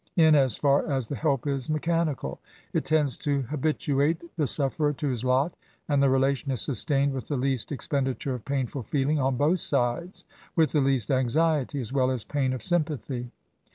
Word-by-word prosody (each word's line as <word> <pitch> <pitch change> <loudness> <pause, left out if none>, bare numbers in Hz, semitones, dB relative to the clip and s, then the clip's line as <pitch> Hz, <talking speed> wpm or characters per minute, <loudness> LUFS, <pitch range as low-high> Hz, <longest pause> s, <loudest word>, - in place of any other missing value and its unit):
In 160 -3 +6
as 135 -6 +4
far 140 -1 +2
as 135 -3 0
the 140 - -5
help 140 -3 0
is 135 -2 -2
mechanical, 155 - -1 0.3
it - - 0
tends 150 -6 +1
to 140 -2 -1
habituate 150 +3 -1
the 155 -4 0
sufferer 145 +2 +1
to 145 0 -2
his 125 -3 -2
lot, 130 +6 +2 0.3
and 145 -2 +2
the 140 - +4
relation 135 +1 +1
is 130 - -2
sustained 140 +1 +1
with 130 -2 -5
the 145 - -1
least 130 -1 -1
expenditure 135 -1 -1
of 125 -3 -6
painful 135 -1 -2
feeling 145 +5 0
on 130 -1 +1
both 155 +7 +2
sides, 145 +7 -1
— - - -26
with 160 -2 +3
the 150 - +2
least 135 -5 +1
anxiety, 145 +2 +1
as 120 -3 -5
weU 130 -1 +2
as 120 - -6
pain 140 -3 -1
of 130 -4 -4
sympathy. 145 -7 -1
140 Hz, 190 wpm, -27 LUFS, 130-150 Hz, 0.3 s, In